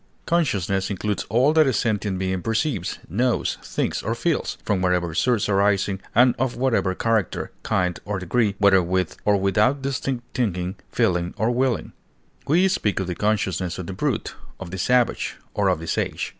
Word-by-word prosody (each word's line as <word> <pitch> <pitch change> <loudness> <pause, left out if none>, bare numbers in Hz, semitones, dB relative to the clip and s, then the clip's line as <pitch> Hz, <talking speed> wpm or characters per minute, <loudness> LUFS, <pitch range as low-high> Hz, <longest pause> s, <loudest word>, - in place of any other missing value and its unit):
Consciousness 100 - 0
includes 105 +1 -2
all 125 +8 +3
that 155 -2 +5
a 130 - +2
sentient 105 -3 0
being 95 0 -1
perceives, 110 - -1
knows, 120 +4 0
thinks, - - -2
or 110 +2 -2
feels, 155 +7 -1
from 100 -3 0
whatever 90 -2 +1
source 120 +5 +1
arising 100 -1 +1
and 125 +1 +6
of 130 -1 0
whatever 120 -7 +1
character, 110 -3 -1
kind, 90 -1 0
or 105 -1 -3
degree, 100 +3 0
whether 100 -2 +5
with 90 0 -1
or 105 -1 +4
without 105 +8 +2
distinct 135 -2 -2
thinking, 90 -6 -1 0.2
feeling, 90 -1 0
or 110 +3 +1
willing; 125 -1 0 0.6
we 175 +6 +4
speak 105 - 0
of 95 - -1
the 90 - -3
consciousness 95 -3 -1
of 90 - -5
the 95 - -5
brute, - - -2 0.3
of 95 -2 -7
the 95 - -5
savage, 125 +4 +1 0.2
or - - +1
of - - +2
the 80 - -7
sage. - - -2
105 Hz, 170 wpm, -23 LUFS, 95-120 Hz, 0.6 s, and